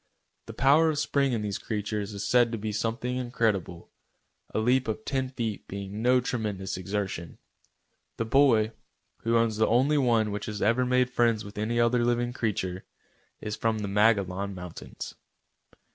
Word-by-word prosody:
The - - -8
power 145 +5 +5
of 155 - -1
spring 140 -2 +1
in 115 -3 -1
these 100 -2 -3
creatures 105 -1 -3
is 100 - -4
said 120 -2 +4
to 115 - -2
be 110 0 -3
something 115 +4 -2
incredible, 110 -8 -1 0.6
a - - -3
leap 125 +3 +2
of 110 0 -3
ten 130 -1 -1
feet 115 -5 -4
being 100 +2 -6
no 125 +2 +4
tremendous 105 -6 -3
exertion. 95 -3 -4 0.8
The 115 - -1
boy, 115 -3 +4 0.5
who 115 0 +1
owns 115 -2 +1
the 110 - +3
only 135 +6 +3
one 115 -5 +2
which 105 0 -4
has 105 -2 -4
ever 120 +5 +2
made 125 0 +2
friends 115 -4 +2
with 100 0 -8
any 115 +3 0
other 120 +1 +3
living 120 0 0
creature, 95 -6 -2 0.6
is 105 0 -3
from 115 -1 0
the 105 -1 -3
Magollon 100 -2 +2
mountains. 90 -2 -8
115 Hz, 165 wpm, -27 LUFS, 105-125 Hz, 0.8 s, power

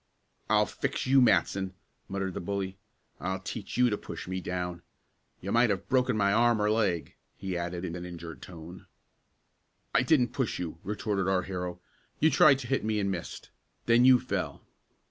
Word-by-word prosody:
"I'll - - +4
fix - - -3
you, 135 +1 +5
Matson!" 95 -3 +2 0.3
muttered 95 -1 -2
the - - -4
bully. 95 +1 -3 0.4
"I'll 95 +1 -2
teach 100 +3 -6
you 125 -1 +4
to 105 - 0
push - - -8
me 95 0 -3
down! 90 -1 -4 0.6
You 95 - -4
might 120 0 +4
have 100 -2 -2
broken 125 -3 +2
my 100 -1 +3
arm 120 0 +4
or 105 0 +2
leg," 100 -7 0 0.2
he 95 -2 -4
added 85 +1 -3
in 85 - -4
an 90 - -6
injured 85 -2 -8
tone. 85 +1 -11 1.1
"I - - +5
didn't 125 -1 +3
push 130 -5 -1
you!" 85 -2 -5
retorted 100 -1 -1
our 95 -1 +2
hero. 90 -1 -5 0.4
"You 160 - +4
tried 135 -3 +6
to 120 - -7
hit 135 +2 0
me 110 -1 0
and 100 -1 0
missed. 85 -3 -6 0.3
Then 120 +1 +5
you 130 -1 +7
fell." - - -3
100 Hz, 180 wpm, -29 LUFS, 90-115 Hz, 1.1 s, you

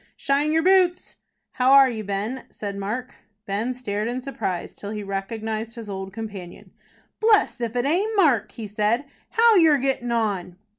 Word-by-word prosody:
"Shine 285 +2 +1
yer 320 +1 +2
boots?" 370 -1 +2 0.3
"How 260 +1 +3
are 275 -1 +8
you, 225 -4 -4
Ben?" 205 +6 -3
said 200 -1 -6
Mark. 225 +7 -4 0.3
Ben 210 +5 -1
stared 215 -4 -3
in 245 +2 -2
surprise 245 -9 -4
till 205 - -8
he 210 -1 -4
recognized 220 +3 -4
his 225 -3 -7
old 190 0 -5
companion. 200 -5 -8 0.5
"Blest 430 - +3
if 235 0 -3
it 245 +1 0
aint 390 +9 +1
Mark," 295 - +3
he 225 - -7
said. 210 +5 0 0.2
"How 460 -1 +5
you're 320 -4 +6
gettin 265 -2 -1
on!" 200 -6 -1
235 Hz, 165 wpm, -24 LUFS, 205-275 Hz, 0.5 s, are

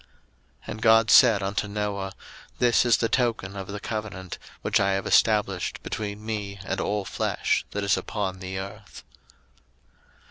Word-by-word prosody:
01:009:017 - - -30 0.6
And 110 - -6
God 110 -1 +5
said 110 -6 +7
unto 100 +2 -1
Noah, 100 -2 -3 0.4
This 120 0 +3
is 120 -3 +5
the 115 - +1
token 115 -6 0
of 95 -1 -6
the 105 +1 -5
covenant, 105 -4 -5 0.2
which - - +2
I 100 -1 +2
have 95 0 -2
established 105 -5 +2
between 105 0 -5
me 105 -3 -4
and - - -2
all 105 -1 -1
flesh - - -1
that 105 - -3
is 100 -1 +2
upon 95 -3 -3
the 95 0 -5
earth. 100 0 -8
105 Hz, 155 wpm, -26 LUFS, 95-110 Hz, 0.6 s, said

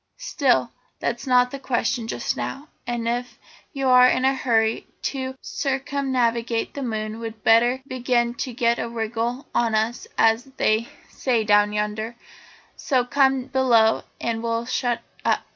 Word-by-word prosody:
"Still, 265 - +1 0.3
that's 240 +3 -3
not 250 -1 +4
the 275 - -6
question 245 -2 -1
just - - -2
now, 290 +3 -5 0.2
and 240 -1 -2
if 245 +1 -3 0.3
you 270 -3 -2
are 250 0 +7
in 255 - +1
a 265 - +4
hurry 225 -4 +1 0.2
to 260 -1 -3
circumnavigate 260 -5 -1
the 280 - -5
moon 220 -3 -3
we'd 225 -1 -7
better 240 +3 +4
begin 245 -2 0
to 250 +2 -4
get 235 0 +1
a 230 - -3
wriggle 230 +3 -3
on 230 -2 +1
us 220 +2 -1
as 225 +3 +3
they 220 +2 +1 0.2
say 240 -4 0
down 205 0 +4
yonder; 210 +2 -3 0.6
so 255 -3 0
come 265 -1 +2
below 250 -4 +3 0.2
and 225 -1 -2
we'll 230 0 -1
shut 245 -1 -1 0.2
up. - - +1
240 Hz, 150 wpm, -23 LUFS, 225-260 Hz, 0.6 s, are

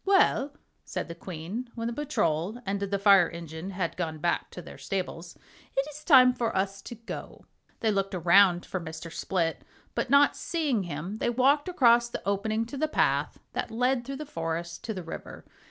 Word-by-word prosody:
"Well," 295 -7 +3 0.3
said - - -5
the - - -4
Queen, 180 +8 -6
when 230 -1 -4
the 235 - -1
Patrol 215 - -1
and 200 +1 -1
the 200 0 -1
Fire 195 -3 +6
Engine 165 +1 -7
had 185 -3 -3
gone 160 -3 -3
back 170 +3 -1
to - - -9
their 175 - -10
stables, 180 -3 -4 0.4
"it 270 +1 +2
is 300 +1 -11
time 255 -5 +7
for 235 -5 -1
us 195 +1 -1
to 240 - -8
go." 230 +1 -8 0.4
They 220 - +2
looked 195 -1 -1
around 180 +1 +5
for 185 - -3
Mr. 160 0 -8
Split, 170 -4 -1 0.3
but - - -1
not 280 +1 +5
seeing 285 - -1
him 175 +6 -5
they - - +1
walked 275 +7 +3
across 240 -8 +4
the 235 - -6
opening 215 +3 0
to 245 +5 -7
the 310 +3 +1
path - - +1 0.2
that - - -2
led 245 +2 +1
through 275 +3 -5
the 305 +2 -6
forest 165 - -4
to 225 - -2
the 185 - -5
river. 165 - -8
200 Hz, 190 wpm, -28 LUFS, 175-250 Hz, 0.4 s, time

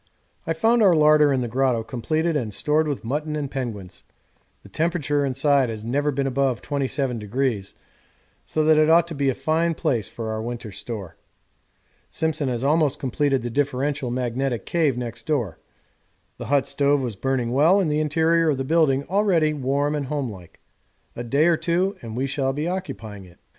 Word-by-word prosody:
I 165 - +1
found 225 +8 +2
our 190 -5 +6
larder 150 -1 +5
in 130 -2 +1
the 120 - -2
grotto 125 -1 +1
completed 155 +8 -1
and 120 -7 -1
stored 155 +1 +1
with 145 -5 -3
mutton 150 +6 -2
and 145 -3 -3
penguins 110 -9 -6 0.6
the - - -13
temperature 155 -3 0
inside 135 -1 +2
has 110 -1 -6
never 145 +5 0
been 140 -1 -1
above 135 -2 0
27°, 130 -6 -2 0.7
so 155 - -1
that 155 0 +5
it 155 0 +4
ought 170 +1 +6
to - - -5
be 140 -2 0
a 130 - 0
fine 165 +1 0
place 115 -10 -1
for 110 -1 -5
our 110 0 -3
winter 120 -1 -6
store. 100 -2 -7 0.9
Simpson 155 -3 -1
has 120 0 -2
almost 150 0 +2
completed 135 -1 0
the 120 - -4
differential 140 0 -1
magnetic 125 -1 -2
cave 155 -7 +1
next 120 -2 -6
door. 120 - -1 0.8
The - - -6
hut 140 -1 +2
stove 145 0 +1
was 120 -5 -3
burning 125 +1 -1
well 155 +9 +4
and 170 -6 +1
the 150 - +1
interior 160 +2 +2
of 145 - +1
the 135 - -2
building 140 -2 +2
already 180 -4 +2
warm 140 +1 0
and 145 -3 -2
homelike 120 - -5 0.6
a 120 - -5
day 140 +6 +2
or 170 -1 +4
two 180 +5 0
and 115 -1 -7
we 130 - 0
shall 135 -1 -1
be 150 +4 -2
occupying 115 - -5
it. 85 -1 -18
140 Hz, 180 wpm, -23 LUFS, 120-155 Hz, 0.9 s, our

